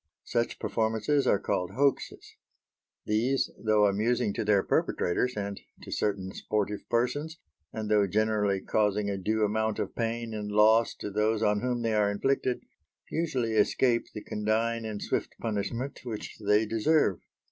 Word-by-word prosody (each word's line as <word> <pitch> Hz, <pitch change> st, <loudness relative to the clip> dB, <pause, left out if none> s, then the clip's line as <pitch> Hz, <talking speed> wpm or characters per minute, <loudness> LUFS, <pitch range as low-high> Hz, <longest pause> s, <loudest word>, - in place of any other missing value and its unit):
Such 120 Hz, -1 st, -1 dB
performances 115 Hz, +5 st, 0 dB
are -, -, +4 dB
called 90 Hz, -1 st, -2 dB
hoaxes. 140 Hz, +1 st, 0 dB, 0.7 s
These, 120 Hz, +6 st, +1 dB
though 110 Hz, -1 st, +4 dB
amusing 105 Hz, +2 st, +1 dB
to -, -, -2 dB
their 105 Hz, -2 st, +3 dB
perpetrators 125 Hz, +7 st, 0 dB
and 100 Hz, -1 st, -4 dB, 0.2 s
to -, -, -9 dB
certain 95 Hz, -2 st, -1 dB
sportive 105 Hz, -1 st, -2 dB
persons, 145 Hz, +7 st, 0 dB, 0.3 s
and 110 Hz, -1 st, -4 dB
though 105 Hz, -1 st, +3 dB
generally 105 Hz, -1 st, +1 dB
causing 105 Hz, 0 st, +1 dB
a 100 Hz, -, -2 dB
due 110 Hz, +3 st, +1 dB
amount 110 Hz, +1 st, 0 dB
of -, -, -3 dB
pain 115 Hz, 0 st, -2 dB
and 105 Hz, -1 st, -4 dB
loss 110 Hz, +2 st, +4 dB
to 105 Hz, -, -6 dB
those 105 Hz, +2 st, +1 dB
on 105 Hz, -1 st, +2 dB
whom 125 Hz, -1 st, -1 dB
they 115 Hz, -1 st, +1 dB
are 105 Hz, -1 st, +3 dB
inflicted, 130 Hz, +4 st, 0 dB, 0.5 s
usually 130 Hz, -9 st, -1 dB
escape 115 Hz, +3 st, +2 dB
the 105 Hz, -, -6 dB
condign 110 Hz, +2 st, -1 dB
and 105 Hz, -2 st, -4 dB
swift -, -, -2 dB
punishment 115 Hz, +5 st, -3 dB
which 115 Hz, -4 st, -6 dB
they 105 Hz, +2 st, +3 dB
deserve. 115 Hz, -, +2 dB
110 Hz, 150 wpm, -28 LUFS, 105-115 Hz, 0.7 s, are